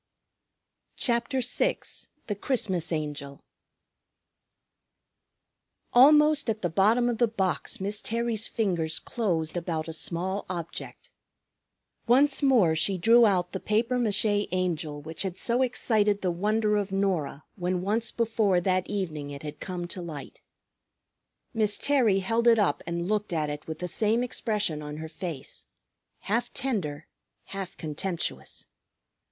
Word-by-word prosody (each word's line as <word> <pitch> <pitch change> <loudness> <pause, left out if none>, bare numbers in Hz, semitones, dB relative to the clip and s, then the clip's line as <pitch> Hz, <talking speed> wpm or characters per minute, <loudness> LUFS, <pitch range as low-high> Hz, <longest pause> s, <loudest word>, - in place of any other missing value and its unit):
CHAPTER 240 +2 0
VI 250 - +1 0.5
THE 210 - -2
CHRISTMAS 190 - -1
ANGEL 145 -3 -4 2.5
Almost 300 +2 +6
at 220 -1 -2
the 175 - 0
bottom 220 +8 +3
of 235 -2 -1
the 240 - +4
box 195 -5 -1
Miss 205 +2 -1
Terry's 230 -1 -1
fingers 175 -8 0
closed 175 -9 -1
about 165 -2 -2
a 160 - -5
small 185 +5 -2
object. 170 -2 -6 1.0
Once 270 +5 +4
more 235 - +4
she 185 +5 +2
drew 230 +6 +6
out 180 -3 +1
the 190 - -4
papier 230 +5 +1
mâché 210 -2 +2
Angel 165 -5 -1
which 160 +2 -4
had 190 -2 -3
so 240 +5 +1
excited 215 -5 +1
the 180 - +1
wonder 210 +4 +1
of 200 -1 -2
Norah 185 -7 -1
when 180 -1 -2
once 220 +3 0
before 220 -5 +1
that 185 0 0
evening 160 -8 -3
it 140 0 -8
had 150 -1 -7
come 180 -2 -4
to 180 - -5
light. 155 -5 -8 1.1
Miss 215 -3 +2
Terry 235 -9 +3
held 230 +5 +1
it 230 -1 +7
up 205 -3 +1
and 170 0 -2
looked 210 -2 -1
at 155 -2 0
it 145 0 -7
with 160 - -5
the 180 - -4
same 220 +6 +1
expression 210 -10 -1
on 150 0 -6
her 160 +1 -6
face, 160 -4 -6 0.5
half 235 +4 -1
tender, 170 - -2 0.4
half 195 -2 -7
contemptuous. 165 +3 -4
195 Hz, 135 wpm, -27 LUFS, 170-225 Hz, 2.5 s, it